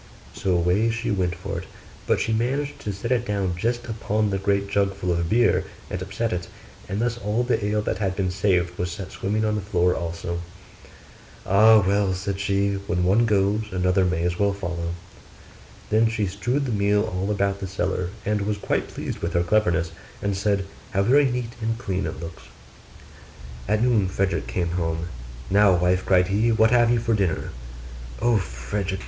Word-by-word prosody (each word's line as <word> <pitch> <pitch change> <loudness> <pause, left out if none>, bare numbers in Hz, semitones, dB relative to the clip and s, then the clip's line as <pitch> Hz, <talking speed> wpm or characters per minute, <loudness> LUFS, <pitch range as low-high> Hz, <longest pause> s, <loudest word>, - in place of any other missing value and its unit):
So 95 - -1
away 90 +6 +2
she 115 0 -2
went 90 -3 0
for 100 +3 -5
it: - - -9 0.4
but - - +2
she 110 - 0
managed 140 +5 -1
to 105 - -3
set 100 +5 -5
it 120 -2 +2
down 100 -5 -1
just 120 +6 -1
upon 110 -2 -1
the 95 - -1
great 100 0 +1
jug 100 -1 +1
full 90 -2 -2
of 85 -1 0
beer, 120 +3 +3 0.3
and 90 - -3
upset 100 +4 -2
it; 90 -1 -3 0.4
and 100 +2 -2
thus 120 +1 -1
all 110 +2 0
the 120 -3 0
ale 105 +1 0
that 90 - -2
had 95 -3 -1
been 95 -2 0
saved 90 -2 +1
was 90 -1 -1
set 95 +1 -7
swimming 110 +3 -1
on 105 - +1
the 105 - -1
floor 90 -2 +2
also. 85 0 -4 1.0
'Ah! 110 +2 +6
well,' 100 -1 +2
said 95 +1 -3
she, 100 0 +1
'when 90 0 0
one 105 +6 +4
goes 105 +1 +2
another 90 +1 +2
may 90 -2 0
as 85 0 -1
well 100 -1 +2
follow.' 85 -3 -4 1.0
Then 110 +1 +4
she 110 -2 -1
strewed 120 +9 -1
the 125 - -2
meal 105 0 +2
all 95 -2 -2
about 100 -1 0
the 95 - -4
cellar, 90 -1 -2 0.2
and 105 0 0
was 105 +1 -1
quite - - -1
pleased - - -5
with 85 - -3
her 85 -1 +2
cleverness, 90 -4 +1 0.3
and 100 -1 -1
said, 100 0 0 0.3
'How 100 - +2
very 140 +7 +5
neat 120 -2 -3
and 115 +1 -1
clean 95 -5 -2
it - - -6
looks!' 80 0 -8 1.2
At 105 +3 +2
noon 115 -6 +3
Frederick 95 -8 -1
came 85 +8 -1
home. 80 +1 -2 0.4
'Now, 100 -1 +5
wife,' 90 +1 +1
cried 90 -1 +4
he, 110 +4 +2
'what 110 0 +4
have 120 -1 +5
you 120 - +3
for 115 0 0
dinner?' 95 -6 0 0.7
'O 120 -1 +3
Frederick! 95 +3 -3
100 Hz, 190 wpm, -24 LUFS, 90-110 Hz, 1.2 s, Ah